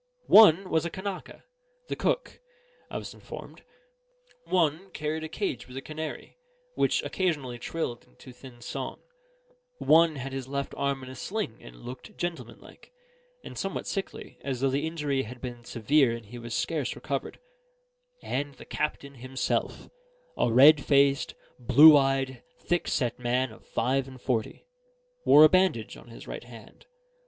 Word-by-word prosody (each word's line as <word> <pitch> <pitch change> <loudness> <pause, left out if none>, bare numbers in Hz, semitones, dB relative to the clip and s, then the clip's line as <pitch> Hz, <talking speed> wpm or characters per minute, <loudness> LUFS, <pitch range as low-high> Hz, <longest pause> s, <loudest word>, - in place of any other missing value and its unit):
One 195 -3 +7
was 160 -1 +2
a 170 - -2
Kanaka 190 +2 -7 0.4
the - - -3
cook, - - -1 0.5
I - - -4
was - - -7
informed; - - -10 0.8
one 170 +1 +1
carried 155 +1 -3
a 160 - -5
cage 160 - -3
with 125 +1 -10
a - - -4
canary, 155 - -7 0.4
which - - +1
occasionally 145 -10 -2
trilled 125 -3 -4
into 60 - -15
thin 125 -1 -14
song; - - -5 0.8
one 165 - +4
had 135 0 -6
his 135 -1 -5
left 140 0 -3
arm 140 -1 -1
in 130 - -9
a - - -9
sling 200 - -4
and - - -12
looked 130 - -9
gentlemanlike, 175 -2 -7 0.5
and - - -9
somewhat 195 - -3
sickly, 195 - -5
as 135 -3 -3
though 135 -1 +2
the 145 +4 0
injury 150 -4 -1
had 125 0 -8
been 120 -1 -7
severe 120 +3 +2
and 115 -1 -10
he 120 +4 -10
was 120 0 -5
scarce 155 -5 -1
recovered; 140 -2 -4 0.9
and 140 +1 -3
the - - -13
captain 140 -2 -3
himself 130 +1 -3 0.5
a 120 - +1
red 140 +5 +7
faced, 140 -1 +3 0.2
blue 145 +6 +8
eyed, 135 -2 +1 0.2
thickset 140 -9 -1
man 125 +1 0
of 110 - -16
five 130 +3 0
and 130 -1 -11
forty 120 -3 -2 0.6
wore 150 - +8
a - - +10
bandage 185 - +2
on - - -14
his 115 - -12
right - - -7
hand. 115 - -14
135 Hz, 155 wpm, -28 LUFS, 125-160 Hz, 0.9 s, a